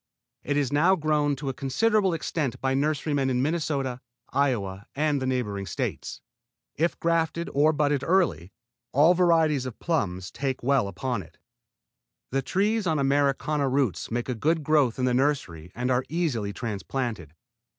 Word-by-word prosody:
It 145 - -1
is 145 -2 0
now 170 +6 +4
grown 150 -3 +1
to 135 0 -4
a - - -2
considerable 195 - +1
extent 150 -5 -2
by 135 0 0
nurserymen 145 -1 0
in 125 0 +1
Minnesota, 140 -5 -1 0.3
Iowa 105 -9 0
and 145 -1 +1
the 130 - -1
neighboring 105 -7 -2
States. - - -4 0.5
If 170 +3 -1
grafted, 165 0 0
or 150 +3 +4
budded 145 -2 +1
early, 100 - +1 0.4
all 150 +6 +6
varieties 165 -6 +3
of 120 - -8
plums 95 - -2
take 135 -3 -3
well 135 -5 +2
upon 105 +4 -3
it. 80 -1 -16 0.9
The 135 +1 +1
trees 205 +5 0
on 160 -2 +1
Americana 140 +1 +1
roots 130 -6 0
make 120 +1 -2
a 125 - -1
good 155 +7 0
growth 145 -6 +2
in 130 - 0
the 125 - +2
nursery 120 - -1
and 125 +2 -1
are 125 +1 +2
easily 145 -12 -1
transplanted. 105 - -4
140 Hz, 155 wpm, -26 LUFS, 125-155 Hz, 0.9 s, all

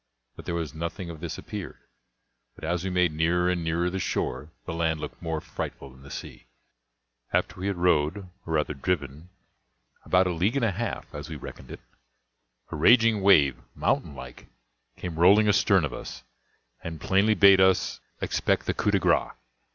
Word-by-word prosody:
But - - -11
there 85 - -2
was 80 -5 -3
nothing 85 +2 -5
of 80 - -10
this 85 -1 -5
appeared; - - -7 0.8
but - - -17
as 85 +2 -1
we 95 - -2
made 90 -3 +2
nearer 85 +3 +1
and 90 -2 -2
nearer 85 +2 0
the 95 +2 -2
shore, 75 -4 -2 0.2
the 85 - -4
land 80 -1 0
looked 75 - -8
more 80 -1 -2
frightful 70 -2 -7
than 65 +1 -18
the 70 - -13
sea. - - -9 0.8
After - - -1
we 95 - -3
had 100 - -1
rowed, 85 -1 +2
or 90 -3 -9
rather 75 -1 0
driven, 75 +1 -3 0.7
about 90 +1 +3
a 90 - 0
league 95 +9 0
and 135 -4 +2
a 110 - +1
half, 115 +6 -5
as 75 +2 -7
we 80 - -6
reckoned 70 - -10
it, - - -9 0.9
a - - -4
raging 115 +6 +5
wave, 75 -11 +5
mountain 70 - 0
like, 65 -1 -11 0.5
came 85 -3 -6
rolling 100 +5 +6
astern 100 -4 +4
of 70 - -5
us, - - -8 0.6
and 80 -2 -6
plainly 100 +6 +2
bade 100 -2 +7
us 95 -3 +2 0.2
expect - - 0
the - - 0
coup - - 0
de - - +3
grace. - - +1
85 Hz, 180 wpm, -26 LUFS, 80-95 Hz, 0.9 s, bade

